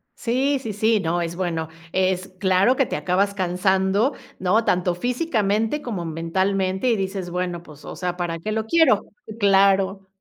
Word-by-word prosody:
sí, 265 Hz, +4 st, 0 dB
sí, 225 Hz, -4 st, -5 dB
sí, 215 Hz, +1 st, +2 dB
no 170 Hz, +1 st, 0 dB
es 170 Hz, 0 st, -3 dB
bueno, 170 Hz, -3 st, -2 dB, 0.2 s
es 185 Hz, 0 st, 0 dB
claro 190 Hz, +6 st, +3 dB
que 270 Hz, -, +3 dB
te -, -, -4 dB
acabas 185 Hz, +6 st, +1 dB
cansando, 190 Hz, +5 st, +1 dB, 0.3 s
¿no?, 190 Hz, +5 st, +2 dB
tanto 180 Hz, -3 st, +1 dB
físicamente 225 Hz, -, 0 dB
como 205 Hz, -10 st, -4 dB
mentalmente 190 Hz, +5 st, -1 dB
y 235 Hz, -, +3 dB
dices: 190 Hz, -2 st, -3 dB
"Bueno, 180 Hz, -1 st, -3 dB
pues, 150 Hz, -3 st, -15 dB
o -, -, -8 dB
sea, 180 Hz, -1 st, -2 dB
¿para 175 Hz, -2 st, -3 dB
qué 215 Hz, +6 st, -3 dB
lo 220 Hz, 0 st, -1 dB
quiero?". 320 Hz, -5 st, +4 dB, 0.4 s
Claro. 195 Hz, -1 st, +3 dB
190 Hz, 165 wpm, -23 LUFS, 180-215 Hz, 0.4 s, quiero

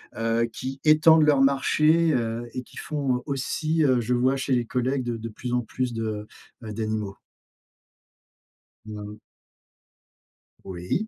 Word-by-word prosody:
heu, 115 Hz, +1 st, +1 dB
qui 130 Hz, +3 st, -6 dB
étendent 155 Hz, +1 st, +6 dB
leur 145 Hz, -3 st, +4 dB
marché, 155 Hz, +4 st, +3 dB
heu, 115 Hz, -1 st, -2 dB
et 125 Hz, -, -3 dB
qui -, -, -17 dB
font, 135 Hz, -5 st, -2 dB
aussi, 155 Hz, +3 st, -1 dB
heu, 130 Hz, -4 st, +3 dB
je 120 Hz, +1 st, -1 dB
vois 130 Hz, +2 st, +2 dB
chez 135 Hz, 0 st, -1 dB
les 120 Hz, -1 st, +1 dB
collègues 130 Hz, +3 st, -1 dB
de 120 Hz, -1 st, -3 dB
de 115 Hz, +1 st, -6 dB
plus 120 Hz, +3 st, -6 dB
en 125 Hz, -, +2 dB
plus 125 Hz, +2 st, -3 dB
de 110 Hz, -2 st, -4 dB, 0.3 s
ben 110 Hz, -2 st, -7 dB
d'animaux. 110 Hz, -2 st, -3 dB, 1.7 s
Mmh. 105 Hz, -1 st, -8 dB, 1.5 s
Oui. 95 Hz, -, -3 dB
125 Hz, 140 wpm, -25 LUFS, 115-140 Hz, 1.7 s, étendent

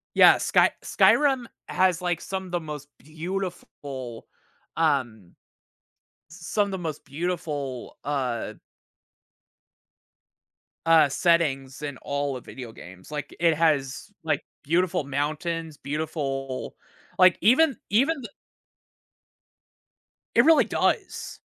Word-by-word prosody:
Yeah, -, -, +8 dB
Sky -, -, +3 dB
Skyrim 270 Hz, -4 st, +4 dB, 0.2 s
has 185 Hz, -2 st, +2 dB
like 175 Hz, -2 st, -1 dB
some 190 Hz, -1 st, -5 dB
the 175 Hz, -, 0 dB
most 150 Hz, -3 st, -7 dB
beautiful, 155 Hz, -6 st, -6 dB, 0.5 s
um, 125 Hz, -, 0 dB, 0.9 s
some 175 Hz, +5 st, -1 dB
of -, -, -6 dB
the 190 Hz, -, -2 dB
most 160 Hz, -4 st, -5 dB
beautiful, 145 Hz, -5 st, -4 dB
uh 130 Hz, -5 st, -2 dB, 2.3 s
uh, 165 Hz, -2 st, +6 dB
settings 140 Hz, -4 st, +1 dB
in 145 Hz, -3 st, -5 dB
all 140 Hz, -1 st, -2 dB
of 125 Hz, -, -8 dB
video 125 Hz, -4 st, -9 dB
games, 90 Hz, -1 st, -13 dB
like, 150 Hz, -1 st, -5 dB
it 165 Hz, -1 st, +4 dB
has, 150 Hz, +1 st, 0 dB
like, 160 Hz, -, 0 dB, 0.2 s
beautiful 170 Hz, +1 st, +1 dB
mountains, 155 Hz, +3 st, -2 dB
beautiful 140 Hz, -3 st, -4 dB, 0.4 s
like 185 Hz, -1 st, +7 dB
even, 265 Hz, -, +5 dB
even 270 Hz, +10 st, +3 dB
th 215 Hz, -, -9 dB, 2.0 s
It 235 Hz, -, +6 dB
really 325 Hz, 0 st, +6 dB
does. -, -, -1 dB
155 Hz, 105 wpm, -26 LUFS, 135-180 Hz, 2.3 s, Yeah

